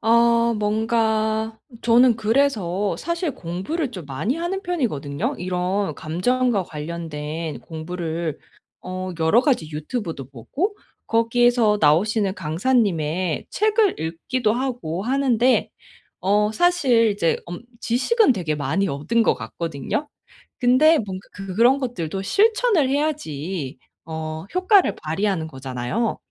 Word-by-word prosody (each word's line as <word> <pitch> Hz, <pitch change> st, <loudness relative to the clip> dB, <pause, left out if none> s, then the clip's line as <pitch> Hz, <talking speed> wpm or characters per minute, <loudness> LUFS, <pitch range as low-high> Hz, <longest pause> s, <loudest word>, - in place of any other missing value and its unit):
어 235 Hz, 0 st, +4 dB
뭔가 220 Hz, +1 st, 0 dB, 0.2 s
저는 240 Hz, +1 st, +5 dB
그래서 215 Hz, -5 st, +1 dB
사실 340 Hz, -1 st, -2 dB
공부를 195 Hz, -, -3 dB
좀 180 Hz, -, -8 dB
많이 155 Hz, -, -2 dB
하는 350 Hz, +4 st, -3 dB
편이거든요. 215 Hz, -, -2 dB
이런 185 Hz, +2 st, -1 dB
감정과 205 Hz, +7 st, 0 dB
관련된 155 Hz, -2 st, -5 dB
공부를 165 Hz, +1 st, -4 dB, 0.4 s
어 185 Hz, 0 st, -5 dB
여러 160 Hz, +8 st, +4 dB
가지 255 Hz, -, +1 dB
유튜브도 155 Hz, -, -4 dB
보고 295 Hz, -, -3 dB, 0.3 s
거기에서 230 Hz, -1 st, +3 dB
나오시는 190 Hz, +6 st, +3 dB
강사님의 175 Hz, -, 0 dB
책을 430 Hz, -1 st, +2 dB
읽기도 210 Hz, +9 st, -1 dB
하고 235 Hz, -9 st, -3 dB
하는데 255 Hz, 0 st, +2 dB, 0.5 s
어 210 Hz, +2 st, +2 dB
사실 260 Hz, -8 st, +3 dB
이제 185 Hz, -5 st, +1 dB
엄 175 Hz, +2 st, -7 dB, 0.2 s
지식은 275 Hz, -, +3 dB
되게 165 Hz, -7 st, -2 dB
많이 155 Hz, +7 st, 0 dB
얻은 150 Hz, +10 st, 0 dB
것 -, -, +3 dB
같거든요. 165 Hz, -, -4 dB, 0.5 s
근데 275 Hz, +6 st, +5 dB
뭔가 190 Hz, -3 st, -5 dB
그 195 Hz, -2 st, -7 dB
그런 240 Hz, +5 st, +5 dB
것들도 195 Hz, -, -3 dB
실천을 420 Hz, -, +3 dB
해야지 185 Hz, -, -2 dB, 0.3 s
어 160 Hz, 0 st, -5 dB
효과를 370 Hz, +1 st, +4 dB
발휘하는 165 Hz, +1 st, -1 dB
거잖아요. 130 Hz, -, -3 dB
210 Hz, 260 characters per minute, -22 LUFS, 165-250 Hz, 0.5 s, 저는